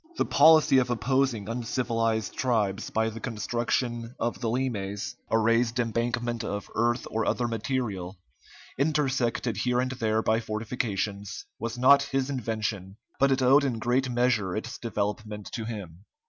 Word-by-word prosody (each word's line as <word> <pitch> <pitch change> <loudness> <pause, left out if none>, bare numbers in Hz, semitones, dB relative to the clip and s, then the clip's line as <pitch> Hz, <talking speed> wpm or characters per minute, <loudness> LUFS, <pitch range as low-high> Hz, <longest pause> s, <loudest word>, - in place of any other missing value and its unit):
The - - +2
policy 155 -4 +6
of 125 -1 0
opposing 125 -3 0
uncivilized 115 -2 -1
tribes 110 -5 0
by 110 0 +1
the 115 - -8
construction 120 +1 -2
of 120 +1 -2
the 115 - 0
limes, 105 -5 -2
a 110 - +3
raised 115 +2 +2
embankment 120 0 -1
of 100 -1 -4
earth 120 +1 +1
or 110 0 0
other 120 - 0
material, 110 -6 -3 0.6
intersected 135 -6 0
here 125 0 +1
and 130 +1 0
there 110 -3 0
by 110 +1 +2
fortifications, 105 -3 -3
was 115 +2 -4
not 135 +3 +6
his 135 +1 -1
invention, 110 -6 -3 0.2
but 140 0 +4
it 130 0 +2
owed 135 +3 +6
in 130 -5 0
great 125 +3 +1
measure 120 -6 +1
its 110 - -5
development 105 -1 -3
to 115 - -4
him. 100 -6 -7
115 Hz, 145 wpm, -27 LUFS, 110-125 Hz, 0.6 s, policy